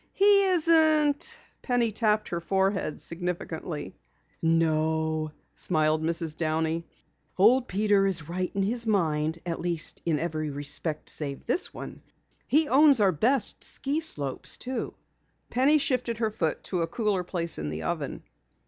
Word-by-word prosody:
"He 400 0 +5
isn't 315 -4 +3
?" - - -40
Penny 245 -3 0
tapped 215 0 0
her 170 -1 -3
forehead 190 -2 -1
significantly. 170 -3 -4 0.5
"No," 160 -1 0 0.2
smiled 155 -2 +1
Mrs. 165 -1 -1
Downey. 160 +1 -2 0.5
"Old 240 +6 +4
Peter 200 0 +2
is 175 -6 0
right 180 +2 -3
in 195 - 0
his 230 +3 0
mind, 160 -6 0
at 170 -1 -3
least 170 -2 0
in 165 -3 0
every 155 -1 -3
respect 145 +2 -1
save 140 -3 -1
this 290 +10 0
one. - - -9 0.5
He 305 +2 +3
owns 280 -1 +5
our 200 -2 +4
best 230 - +2
ski 280 +3 -1
slopes, 145 - -2
too." 255 -2 -5 0.6
Penny 275 +5 +3
shifted 250 -5 0
her 220 -1 -1
foot 165 -7 -2
to 180 -3 -2
a 165 - -1
cooler 205 -1 -1
place 170 -2 -1
in 75 -1 -4
the 75 +1 -5
oven. 80 - -4
180 Hz, 145 wpm, -26 LUFS, 160-240 Hz, 0.6 s, He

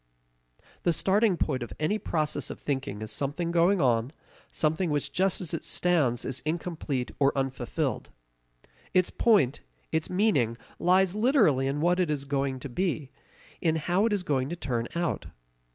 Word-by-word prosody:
The 170 - +2
starting 195 +2 +2
point 130 - -1
of 120 - -6
any 180 +8 0
process 155 -6 -1
of - - -7
thinking 135 -6 -3
is 110 - -5
something 145 +8 -2
going 175 +3 +3
on, 120 -3 +2 0.4
something 160 +3 0
which 145 -1 -1
just 190 +4 +1
as 175 -3 -4
it 165 - -3
stands 160 -7 +1
is 130 -1 -2
incomplete 155 -5 -3
or 140 -1 +4
unfulfilled. 135 -1 -2 0.9
Its 185 -1 +3
point, 165 - +3 0.3
its 160 0 0
meaning 155 - +2 0.2
lies 185 +1 +3
literally 210 - +3
in 140 +2 -1
what 175 +2 +2
it 180 -3 +1
is 145 -2 -1
going 135 -1 -1
to - - -5 0.2
be, 155 -7 -2 0.5
in 160 -1 +2
how 175 +7 +1
it - - -1
is 205 -3 0
going 135 -4 0
to 175 - -3
turn 120 -8 -2
out. 170 -1 -1
155 Hz, 165 wpm, -28 LUFS, 135-180 Hz, 0.9 s, or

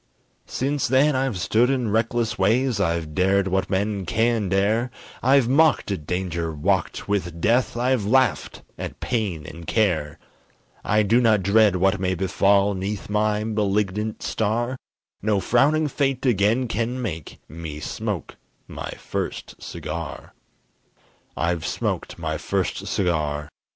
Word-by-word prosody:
Since 140 +1 -1
then 135 +3 +3
I've 130 -5 0
stood 115 +7 +2
in 125 -5 0
reckless 115 0 0
ways, 115 +4 +2
I've 85 -4 -1
dared 95 +3 +2
what 95 0 0
men 100 -1 -1
can 115 -2 +1
dare, 105 +6 +1 0.3
I've 135 -1 +4
mocked 145 -3 +3
at 80 -7 -4
danger, 85 -2 -2
walked 75 -1 -1
with 90 -5 -2
death, 120 +6 +2
I've 125 -2 +1
laughed 130 +5 +1 0.2
at - - -6
pain 100 -11 -2
and 85 +2 -10
care. 85 -10 +1 0.7
I 105 0 +2
do 115 +5 +3
not 110 -5 +3
dread 100 0 +4
what 95 +1 +2
may 95 -1 0
befall 100 +2 +2
'Neath 100 +2 -4
my 105 0 +1
malignant 105 0 -1
star, 115 +4 -1 0.5
No 105 -1 +1
frowning 150 +9 +3
fate 135 -2 -1
again 115 +2 +2
can 115 +3 -2
make 85 - -5
Me 80 -1 -7
smoke - - -4 0.3
my - - -6
first - - -5
cigar. - - -6 1.0
I've 85 -1 0
smoked - - -3
my - - -3
first - - -2
cigar! 75 -5 -1
105 Hz, 135 wpm, -23 LUFS, 95-120 Hz, 1.0 s, I've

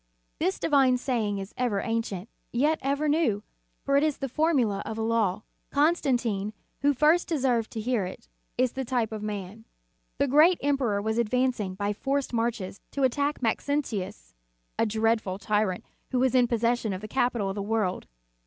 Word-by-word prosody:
This 190 - +1
divine 270 -4 +3
saying 230 -6 -1
is 195 +1 -6
ever 240 -5 0
ancient, 225 -4 -2 0.2
yet 295 +6 +2
ever 280 +3 0
new, 290 -10 +1 0.4
for 275 0 +2
it 285 - +3
is 305 -2 +1
the 275 - -3
formula 255 -8 +1
of 220 - -5
a - - -2
law. 220 -3 +1 0.3
Constantine, 250 - +1 0.3
who 285 +1 +4
first 305 +5 +3
deserved 255 -8 +1
to 225 - -6
hear 220 -4 0
it, 185 +5 -10 0.3
is 255 0 +2
the 265 - -3
type 240 -3 -1
of 215 -1 -5
man. 210 0 -5 0.5
The 280 - +2
great 310 +6 +6
emperor 255 -8 +1
was 220 +2 0
advancing 235 -4 0
by 205 +1 -1
forced 275 +4 -2
marches 230 -4 -2
to 280 - -1
attack 285 +2 +1
Maxentius, 220 - -2 0.5
a 225 - +3
dreadful 220 -3 0
tyrant 205 -2 0 0.2
who 255 - -1
was 260 +1 +2
in 250 -2 +5
possession 235 -2 +1
of 185 - -5
the 215 - -6
capital 235 -4 0
of - - -2
the 205 - -3
world. 205 -3 -1
235 Hz, 170 wpm, -27 LUFS, 210-270 Hz, 0.5 s, great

